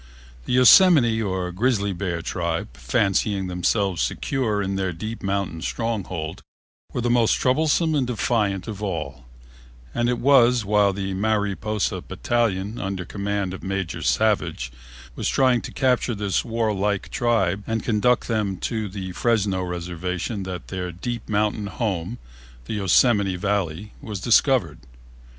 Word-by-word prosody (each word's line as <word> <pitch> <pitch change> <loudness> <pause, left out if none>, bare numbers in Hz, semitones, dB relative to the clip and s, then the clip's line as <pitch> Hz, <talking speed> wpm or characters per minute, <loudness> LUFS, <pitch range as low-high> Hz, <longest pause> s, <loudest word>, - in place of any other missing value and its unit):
The - - -2
Yosemite 125 -3 +6
or 95 -3 -2
Grizzly 100 0 0
Bear 85 -3 -3
tribe, 85 -8 -3
fancying 95 - 0
themselves 90 0 0
secure 120 -7 -1
in 100 -1 -1
their 95 -1 -1
deep 110 +7 -6
mountain 95 -4 -2
stronghold, 95 -9 -3 0.5
were 125 - -2
the 120 0 +1
most 120 -2 +4
troublesome 155 +4 +2
and 135 -4 +1
defiant 105 -5 0
of 105 -2 -6
all, 75 -10 -4 0.7
and 120 0 +1
it 125 - +1
was 125 -3 +4
while 105 0 +3
the 95 0 -3
Mariposa 105 0 -1
battalion, 110 -3 -1
under 95 -2 -3
command 100 0 -3
of 95 - -7
Major 95 -3 -3
Savage, - - +1 0.4
was - - -1
trying 130 -3 +3
to - - -7
capture 125 -3 +1
this 100 -3 0
warlike 105 -4 -1
tribe 105 -5 +1
and 115 0 -1
conduct 120 +2 +2
them 105 -5 -1
to 110 0 -3
the 95 -1 -6
Fresno 100 -2 +1
reservation 90 +3 -4
that 90 -2 -6
their 90 -2 -4
deep 115 +7 -5
mountain 105 0 0
home, 100 -1 -3 0.5
the - - -5
Yosemite 100 0 +3
Valley, 100 0 -2
was 105 -3 -5
discovered. 115 - +3
100 Hz, 135 wpm, -23 LUFS, 95-115 Hz, 0.7 s, Yosemite